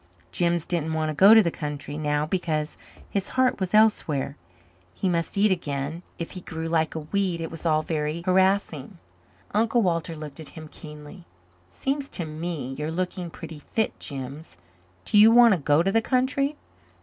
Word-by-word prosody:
Jims 170 -2 0
didn't 160 -2 -1
want 155 -1 0
to - - -2
go 195 +8 +8
to 220 - +8
the 170 - 0
country 145 -2 -5
now 150 -1 0
because 155 -3 -2 0.4
his 200 -2 -1
heart 255 -3 +3
was 190 +1 -1
elsewhere. 155 -11 +2 0.6
He 195 - -1
must 170 +1 0
eat 205 +1 +4
again, 145 -2 -2 0.2
if 170 - -5
he 185 - -7
grew 160 -1 -5
like 160 -1 0
a 160 - -3
weed. 180 +2 -1
It 165 - -5
was 165 +1 -4
all 155 -1 +2
very 155 +1 -2
harassing. 190 -4 +1 0.6
Uncle 225 +2 +2
Walter 165 -2 -1
looked 150 -2 -9
at 160 - -8
him 155 -1 -8
keenly. 150 +4 -11 0.4
"It - - -28
seems 275 +1 -2
to 175 - -2
me 155 -4 -5
you're 150 +1 -2
looking 180 +1 -3
pretty 160 -1 -9
fit, 220 +9 -2
Jims. 140 - -7 0.5
Do 210 - +4
you 215 +2 +9
want 235 0 +7
to 185 - 0
go 145 +2 +3
to 195 - +1
the 225 - +3
country?" 275 +4 +1
165 Hz, 185 wpm, -25 LUFS, 155-195 Hz, 0.6 s, you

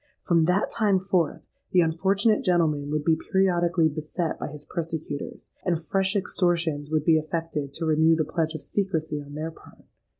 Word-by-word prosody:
From 165 -2 +3
that 180 +4 +1
time 210 -4 +2
forth, 180 -4 0 0.3
the 180 - +6
unfortunate 195 +6 +2
gentleman 155 -6 +1
would 150 0 -1
be 165 - +4 0.2
periodically 175 -4 +3
beset 155 +2 -3
by - - -3
his 150 -1 -10
persecutors; 160 -4 -5
and 170 -3 -1
fresh 190 +3 +1
extortions 170 -6 0
would 155 -1 0
be 160 -2 +5
effected 155 -3 -3
to 165 - -3
renew 160 +1 +4
the 160 -1 0
pledge 160 +1 -1
of 155 - -6
secrecy 160 -7 -2
on 145 0 -10
their 160 +2 -4
part. - - -18
165 Hz, 170 wpm, -26 LUFS, 155-180 Hz, 0.3 s, the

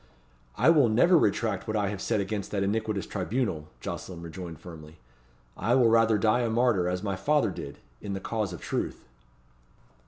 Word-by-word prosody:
"I 165 - +5
will 145 -8 +5
never 150 +12 +5
retract 110 - +1
what 110 0 -1
I 100 -2 0
have 100 -2 -5
said 110 0 0
against 100 +1 -3
that 100 -2 -1
iniquitous 105 0 -1
tribunal," 95 -5 -2
Jocelyn 85 -2 -6
rejoined 85 0 -8
firmly. 80 -3 -11 0.6
"I 120 - +1
will 125 -3 +5
rather 115 -1 +4
die 110 +4 +2
a 120 - 0
martyr, 110 -6 +2
as 90 +1 -3
my 100 -2 -1
father 145 +3 +1
did, 70 -5 -8 0.2
in 100 - -5
the 95 - -3
cause 105 -1 -2
of 90 - -8
truth." - - -3
105 Hz, 180 wpm, -28 LUFS, 90-115 Hz, 0.6 s, I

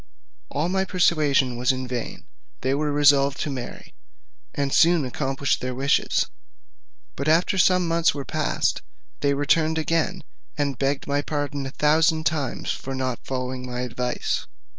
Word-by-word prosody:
All 150 +4 -1
my 190 +1 +1
persuasion 150 -9 +2
was 125 +2 +2
in 130 -1 -4
vain; 125 -2 -5 0.4
they 130 +1 +1
were 150 +1 0
resolved 145 -1 +4
to 150 - -2
marry, 125 -3 -7 0.6
and 140 -1 -1
soon 170 -3 +4
accomplished 135 +1 -1
their 125 0 -3
wishes. 135 +2 +1 0.9
But 140 - -3
after 170 +4 +3
some 180 -1 +4
months 165 0 +3
were 140 -2 -6
past, - - -1 0.4
they 140 0 +1
returned 155 +3 +2
again, 165 +3 0 0.3
and 140 -3 -1
begged 135 0 0
my 145 0 0
pardon 145 -2 -3
a - - -4
thousand 155 +3 +2
times 150 -6 -1
for 135 0 -5
not 130 -2 -2
following 130 -1 -4
my 125 0 -4
advice. 125 0 -2
140 Hz, 150 wpm, -24 LUFS, 130-160 Hz, 0.9 s, resolved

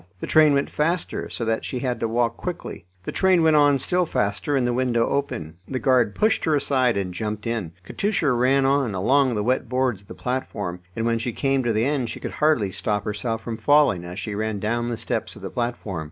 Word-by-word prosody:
The - - -4
train 155 -2 +5
went 140 - 0
faster, 165 +3 -1
so 115 - -4
that 115 0 0
she 130 - -4
had 125 -1 -2
to 115 - 0
walk 115 0 0
quickly. 175 - -6 0.2
The - - -4
train 185 -3 +3
went 160 -1 +5
on 145 -1 +5
still 180 +6 0
faster 105 +5 -1
and 130 -3 +2
the 120 - +1
window 120 -2 +1
opened. 85 - -3
The 130 - -3
guard 125 -5 +2
pushed 215 0 +2
her 155 - +3
aside, 130 -5 +2
and 95 -2 -2
jumped 105 +2 -4
in. 110 -8 -3
Katusha 200 - 0
ran 130 +3 +3
on, 135 -6 +1
along 130 +6 +2
the 105 - -1
wet 125 +1 0
boards 125 -5 0
of 100 - -23
the - - -9
platform, 105 -8 -3 0.2
and 115 - -2
when 115 0 +1
she 115 +1 -3
came 135 +1 +1
to 120 -2 0
the 110 +1 +1
end 135 -4 0
she - - -6
could - - -5
hardly 150 -11 +3
stop 105 +1 -2
herself 115 +2 -3
from 115 -2 -4
falling 145 -7 +3
as 90 +1 -8
she 110 - -4
ran 110 0 -2
down 120 +3 -1
the 120 - -3
steps - - -3
of - - -13
the - - -5
platform. 120 -7 -3
120 Hz, 230 wpm, -23 LUFS, 110-140 Hz, 0.2 s, train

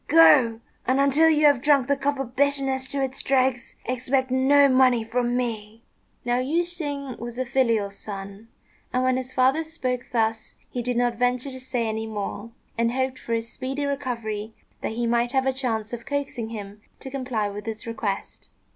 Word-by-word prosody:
Go! 260 -8 +6 0.3
and, 260 +2 +3
until 280 +4 +5
you 305 -1 +4
have 285 -4 +5
drunk 280 -3 +4
the 280 - +3
cup 280 +1 -1
of 260 -2 -5
bitterness 270 -1 +1
to 275 +1 -2
its 265 0 -2
dregs, 260 -2 +1
expect 255 +1 0
no 280 +2 +5
money 255 -3 +4
from 240 +2 0
me." 225 -2 -4 0.4
Now 245 0 +2
Yüeh 305 +7 +1
shêng 290 -7 -5
was 240 +1 -6
a 260 - -1
filial 230 -5 +1
son, 200 +1 -8 0.4
and 255 0 +1
when 255 0 +3
his 255 0 -4
father 260 +5 +3
spoke 255 -6 -3
thus 225 -2 0 0.2
he 245 - -2
did 245 0 -1
not 240 -1 +1
venture 250 +2 +1
to 260 - -8
say 250 -3 -2
any 220 0 -3
more, 210 +1 -5 0.3
and 235 0 +2
hoped 260 0 -1
for 230 - -4
his 230 +1 -2
speedy 270 +2 -3
recovery 230 -6 -3 0.3
that - - -3
he 240 +1 -1
might 235 +1 +1
have 265 -1 +2
a 265 - +2
chance 230 -4 -2
of 235 -1 -6
coaxing 275 -5 -3
him 205 -2 -8 0.2
to 265 - -8
comply 255 -6 -1
with 205 +2 -7
his 225 +2 -5
request. 220 -4 -4
250 Hz, 190 wpm, -25 LUFS, 230-270 Hz, 0.4 s, Go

